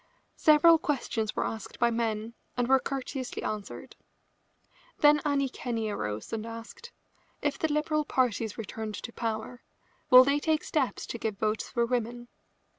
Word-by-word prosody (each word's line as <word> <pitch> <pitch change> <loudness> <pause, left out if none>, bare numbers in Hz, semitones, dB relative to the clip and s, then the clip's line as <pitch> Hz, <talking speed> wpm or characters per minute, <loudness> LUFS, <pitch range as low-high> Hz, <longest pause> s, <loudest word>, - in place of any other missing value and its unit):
Several 320 +2 +6
questions 240 -8 -2
were - - 0
asked 220 - -6
by 235 -1 +3
men 225 -1 -2 0.2
and 245 -1 +1
were 265 +1 +5
courteously 265 -1 -4
answered. 210 -2 -5 1.0
Then 295 0 +5
Annie 280 -2 +1
Kenney 230 -4 -3
arose 105 - -4
and 220 -1 -2
asked: 230 - -9 0.5
"If 290 - 0
the 320 - 0
Liberal 305 0 +1
party 250 -6 +1
is 215 - -7
returned 220 -1 -5
to 235 - -7
power, 225 +1 -4 0.5
will 255 0 +10
they 280 +2 +2
take 310 0 +1
steps 280 -5 -1
to 235 - -6
give 215 -3 -3
votes 215 +1 -1
for 235 -2 +1
women?" 240 0 -3
240 Hz, 155 wpm, -29 LUFS, 220-285 Hz, 1.0 s, will